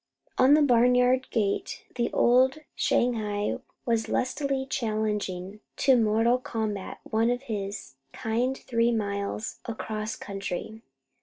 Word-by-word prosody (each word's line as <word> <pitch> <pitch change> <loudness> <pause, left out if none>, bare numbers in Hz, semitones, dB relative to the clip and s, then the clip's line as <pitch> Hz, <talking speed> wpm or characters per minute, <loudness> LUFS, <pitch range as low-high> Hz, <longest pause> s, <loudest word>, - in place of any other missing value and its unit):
On 270 +3 +7
the 305 - +4
barnyard 250 0 +4
gate 205 -3 -1
the 240 -1 -1
old 255 +3 +4 0.2
Shanghai 210 -4 0 0.3
was 230 -2 0
lustily 270 +1 -1
challenging 210 -5 -2 0.2
to 270 -1 +5
mortal 225 +2 +3
combat 215 -5 -4
one 225 +2 +1
of 245 +2 -1
his 200 - -5
kind 240 - -1
three 235 -1 +1
miles 205 -1 -3
across 220 -1 -4
country. 200 +2 -5
225 Hz, 110 wpm, -27 LUFS, 210-250 Hz, 0.3 s, On